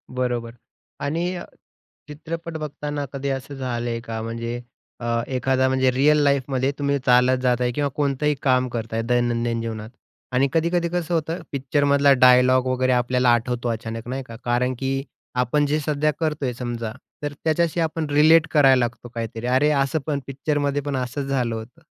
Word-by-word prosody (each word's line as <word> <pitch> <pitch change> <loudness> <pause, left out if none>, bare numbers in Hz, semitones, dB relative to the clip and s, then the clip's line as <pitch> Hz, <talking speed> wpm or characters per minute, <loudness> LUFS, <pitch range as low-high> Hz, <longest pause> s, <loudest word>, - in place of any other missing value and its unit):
बरोबर. 120 -2 -1 0.5
आणि 170 +5 -2 0.7
चित्रपट 165 +2 -6
बघताना 150 -1 -4
कधी 140 0 -3
असं 135 +1 -4
झालं 120 -3 -3
आहे 115 0 -2
का? 115 -1 -5
म्हणजे 115 +1 -4 0.4
अ, 120 - -6 0.2
एखादा, 130 0 +1
म्हणजे 130 0 +2
रिअल 145 +4 +4
लाईफमध्ये 135 -1 +1
तुम्ही 140 0 +1
चालत 125 +1 +5
जात 125 -1 +2
आहे 125 0 +1
किंवा 145 +3 -1
कोणतंही 145 0 +1
काम 130 -1 +2
करता 115 -2 -4
आहे, 115 - 0
दैनंदिन 120 -1 +1
जीवनात. 110 -1 -5 0.4
आणि 130 +2 +3
कधी-कधी 170 +1 +1
कसं 175 -1 -2
होतं, 165 +2 -1
पिक्चरमधला 140 +1 +3
डायलॉग 125 0 +6
वगैरे 130 0 +1
आपल्याला 125 0 +2
आठवतो 120 +1 -1
अचानक, 115 0 -4
नाही 135 +1 -3
का. 115 - -9
कारण 125 +1 +1
की 135 0 -1 0.5
आपण 145 +4 +1
जे 150 +2 +1
सध्या 150 0 0
करतो 155 -3 -1
आहे 125 - -1
समजा, 120 -2 -4 0.3
तर 145 0 -2
त्याच्याशी 165 +1 +1
आपण 160 -1 -1
रिलेट 155 +2 +5
करायला 135 -4 +5
लागतो 120 0 -3
काहीतरी, 115 +1 -4
"अरे, 130 +4 +3
असं 140 +2 +1
पण 145 -2 0
पिक्चरमध्येपण 145 0 -1
असंच 130 +2 -3
झालं 125 -4 0
होतं"? 115 +9 -9
130 Hz, 165 wpm, -23 LUFS, 120-145 Hz, 0.7 s, डायलॉग